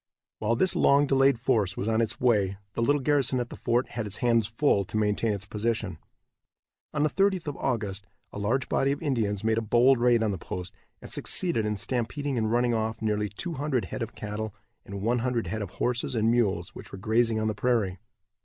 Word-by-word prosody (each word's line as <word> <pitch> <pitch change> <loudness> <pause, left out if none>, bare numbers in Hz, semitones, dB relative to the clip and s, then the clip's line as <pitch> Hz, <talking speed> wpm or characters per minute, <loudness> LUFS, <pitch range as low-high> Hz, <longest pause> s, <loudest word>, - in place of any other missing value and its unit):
While 110 +2 +1
this 185 +10 +3
long 140 +1 +4
delayed 135 -2 +3
force 110 -6 +1
was 100 - -2
on 115 0 +2
its 115 - -1
way 100 -6 +2 0.2
the 115 - -2
little 145 +3 +2
garrison 140 -2 +2
at 120 -1 -4
the - - -6
fort 120 +2 0
had 115 -3 -4
its 105 - -3
hands 115 -3 +2
full 115 -3 +2
to 110 - -3
maintain 105 +1 +1
its 100 -1 -3
position. 110 +2 -2 0.9
On 150 -1 0
the 155 - +3
30th 195 -2 +1
of 145 -2 -4
August 105 -6 -2 0.3
a - - -5
large 120 +6 0
body 135 - +1
of 140 - -7
Indians 110 -8 0
made 110 0 +2
a - - -3
bold 120 +4 +4
raid 120 -1 +4
on 110 - +1
the 95 - -4
post, 90 +1 -6 0.3
and - - -9
succeeded 140 -13 +1
in 105 -1 -1
stampeding 130 +5 -1
and 110 -2 0
running 120 0 +2
off 110 0 -1
nearly 105 -1 -1
two 165 - -5
hundred 135 -6 -1
head - - -4
of - - -5
cattle 105 0 -5 0.3
and 100 0 -6
one 120 +3 +1
hundred 120 -2 -1
head 105 +5 -3
of 100 - -4
horses 125 +5 -1
and 110 0 +2
mules 100 -8 +1
which - - -11
were - - -7
grazing 110 +2 +1
on 110 - -1
the 110 - 0
prairie. 105 -5 0
115 Hz, 220 wpm, -27 LUFS, 105-125 Hz, 0.9 s, long